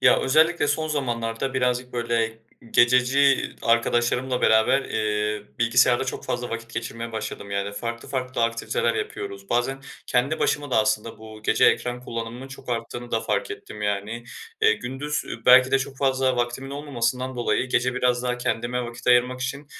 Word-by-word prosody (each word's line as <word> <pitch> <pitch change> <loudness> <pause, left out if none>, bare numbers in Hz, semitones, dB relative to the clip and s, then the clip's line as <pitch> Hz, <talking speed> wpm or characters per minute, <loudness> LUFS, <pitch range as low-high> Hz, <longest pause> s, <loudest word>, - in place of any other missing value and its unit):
Ya - - +6
özellikle 155 +3 +3
son 155 +2 0
zamanlarda 120 -3 -2
birazcık 125 0 0
böyle 115 -2 -1 0.3
gececi 125 +3 +4
arkadaşlarımla 120 +2 +1
beraber, 110 +5 +4
eee, 105 -1 -1 0.2
bilgisayarda 120 +2 +4
çok 130 - -5
fazla 125 0 -3
vakit 115 0 -6
geçirmeye 115 0 -5
başladım. 110 -2 -5
Yani 100 0 -2
farklı 115 +3 -5
farklı 130 -2 -2
aktiviteler 115 - -1
yapıyoruz. 415 - -5
Bazen 135 +3 0 0.2
kendi 135 +6 +1
başıma 145 -1 0
da - - +1
aslında 110 +1 0
bu 110 -1 -11
gece - - +3
ekran 125 0 +2
kullanımının 120 +2 -6
çok 135 -1 -12
arttığını 120 +1 -4
da 115 - +1
fark - - -1
ettim 105 - -8
yani, 105 +3 -2 0.4
eee. 445 0 +6
Gündüz 145 +4 -3 0.2
belki 130 +1 +8
de 135 - +4
çok 135 0 -5
fazla 130 -1 +1
vaktimin 120 +3 -2
olmamasından 130 -3 -2
dolayı 120 +1 0
gece 125 +1 +1
biraz 125 -1 +1
daha 125 -1 -1
kendime 125 +1 -1
vakit 120 0 -9
ayırmak 125 +1 +3
için, 140 +3 -4
125 Hz, 160 wpm, -24 LUFS, 115-135 Hz, 0.4 s, belki